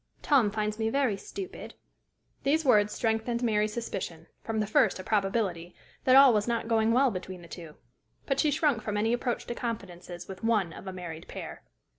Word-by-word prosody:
Tom 265 -8 +4
finds 210 +1 -2
me 220 0 +1
very 265 -4 +1
stupid." 375 - -8 0.7
These 310 +3 +1
words 210 -5 +4
strengthened 225 +2 -1
Mary's 215 -2 +1
suspicion, 180 -8 -5 0.2
from 225 -1 -2
the 210 - +1
first 215 - +3
a 185 - -7
probability, 195 -4 -1 0.3
that 255 - +6
all 270 -2 +9
was 210 0 +1
not 235 -1 -1
going 225 -1 +2
well 255 +2 +4
between 185 -2 -7
the - - -12
two; 165 -3 -10 0.5
but 275 -1 0
she 305 - +3
shrunk 290 -5 +1
from 210 -1 -3
any 225 +3 +1
approach 240 0 -2
to - - -4
confidences 180 -7 -6
with 190 +1 -9
one 210 -7 +1
of - - -10
a - - -3
married 175 -3 -8
pair. - - -8
220 Hz, 190 wpm, -29 LUFS, 190-240 Hz, 0.7 s, all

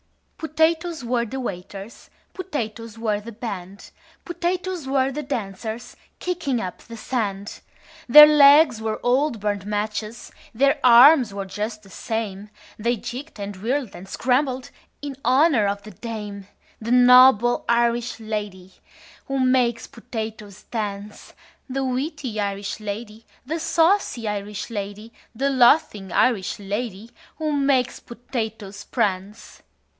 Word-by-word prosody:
"Potatoes 320 -1 0
were 235 0 0
the 265 +4 -6
waiters, 195 -1 -7 0.2
Potatoes 230 - -5
were 215 -2 -1
the 230 +3 -9
band, 200 -4 -8 0.3
Potatoes 355 -2 -3
were 270 0 +1
the 300 +3 -4
dancers 225 -4 -5 0.2
Kicking 340 -9 -2
up 185 -4 -5
the 230 -1 -11
sand: 205 -4 -4 0.5
Their 300 +5 +12
legs 290 -4 +6
were 220 -1 -3
old 255 0 +1
burnt 205 -1 -2
matches, 215 +2 -4 0.2
Their 275 +4 +3
arms 250 0 +7
were 200 -1 -4
just 215 +3 -5
the 195 - -17
same, 210 -2 -4 0.3
They 235 +3 0
jigged 250 +4 -8
and 200 0 -5
whirled 245 +3 -2
and 190 +2 -11
scrambled 260 +3 0 0.3
In 285 -2 -5
honor 260 -3 +3
of 200 0 -3
the 215 - -10
dame: 205 -2 -7 0.3
The 230 +2 -4
noble 250 -1 +6
Irish 235 0 +1
lady 205 -4 -6 0.5
Who 275 0 -2
makes 255 -2 +2
potatoes 220 -4 -8
dance, 205 -2 -6 0.4
The 270 +1 -2
witty 260 -3 -3
Irish 200 0 -3
lady, 215 +1 -7 0.2
The 320 +5 -3
saucy 330 - +1
Irish 210 +2 -4
lady, 205 +1 -6 0.2
The 275 +4 0
laughing 240 - +3
Irish 220 -5 +1
lady 205 +2 -5 0.3
Who 310 -1 -2
makes 275 -3 +1
potatoes 225 -4 -6
prance. 200 -3 -3
230 Hz, 125 wpm, -23 LUFS, 210-265 Hz, 0.5 s, Their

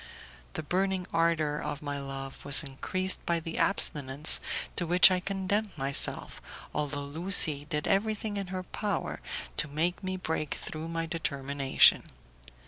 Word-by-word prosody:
The - - -4
burning 190 +3 -1
ardour 160 -3 +1
of 145 - -5
my 145 -1 -4
love 135 -1 -7
was 145 0 +3
increased 185 +7 -2
by 170 -1 +1
the 165 0 -5
abstinence 145 -5 +2 0.3
to 175 - -2
which 180 +2 +7
I 185 - +2
condemned 195 +1 -2
myself, 135 0 0 0.3
although 145 -1 -3
Lucie 155 -1 +3
did 150 0 -3
everything 215 +1 0
in 200 -2 -4
her 185 0 -5
power 205 +2 -4 0.4
to - - +1
make 165 +6 -1
me 185 0 -3
break 160 -4 -3
through 155 +1 -5
my 165 0 -3
determination. 140 -4 +3
165 Hz, 140 wpm, -29 LUFS, 145-185 Hz, 0.4 s, which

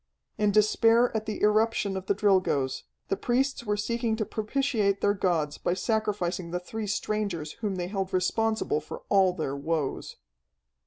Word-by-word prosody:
In 210 -1 +3
despair 225 +3 +4
at 220 0 -2
the 215 - -4
irruption 210 -1 +2
of 190 0 -5
the 200 - +2
Drilgoes, 185 -10 +1 0.2
the - - +1
priests 255 +3 0
were 210 -1 0
seeking 230 +1 -1
to 220 -1 -2
propitiate 215 -2 0
their 205 - +2
gods 165 -7 0
by 175 - 0
sacrificing 190 -4 -1
the 180 +1 -2
three 215 +4 -5
strangers 200 -6 -2
whom 205 -3 -1
they 180 -1 -2
held 195 -1 -3
responsible 220 -1 0
for 155 - -9
all 190 -2 +5
their 155 -6 -3
woes. 145 0 -2
205 Hz, 160 wpm, -27 LUFS, 180-220 Hz, 0.2 s, all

